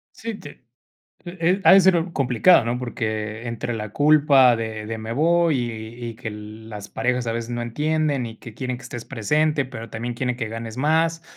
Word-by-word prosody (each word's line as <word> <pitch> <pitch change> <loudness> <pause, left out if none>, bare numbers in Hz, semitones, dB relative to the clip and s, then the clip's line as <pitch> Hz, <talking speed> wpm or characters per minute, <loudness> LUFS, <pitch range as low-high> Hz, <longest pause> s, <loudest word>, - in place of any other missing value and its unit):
Sí 225 -1 -5
te, 145 - -10 0.8
eh 175 +2 -8
eh, 180 +4 +2
ha 190 - +8
de 195 - +9
ser 175 -2 +3
complicado, 135 +3 +4
¿no? 120 +1 -1
Porque 110 -1 -4
entre 115 +1 -3
la 105 -1 -5
culpa 145 -4 +5
de 110 -1 -5
de 110 +1 -4
me 110 +1 -5
voy 165 +1 +3
y 120 0 -5
y 115 - -9
que 115 - -8
l 105 +1 -10
las 105 -1 -8
parejas 125 -1 -1
a 115 - 0
veces 115 0 -4
no 120 0 -3
entienden 150 +2 0
y 115 -1 -8
que 120 - -11
quieren 125 +2 -4
que 120 - -14
estés 120 -2 -7
presente, 150 +5 +1
pero 115 -3 -8
también 120 +3 -4
quieren 125 0 -1
que 115 -3 -3
ganes 115 0 -6
más, 165 +4 +1
120 Hz, 205 wpm, -23 LUFS, 115-150 Hz, 0.8 s, de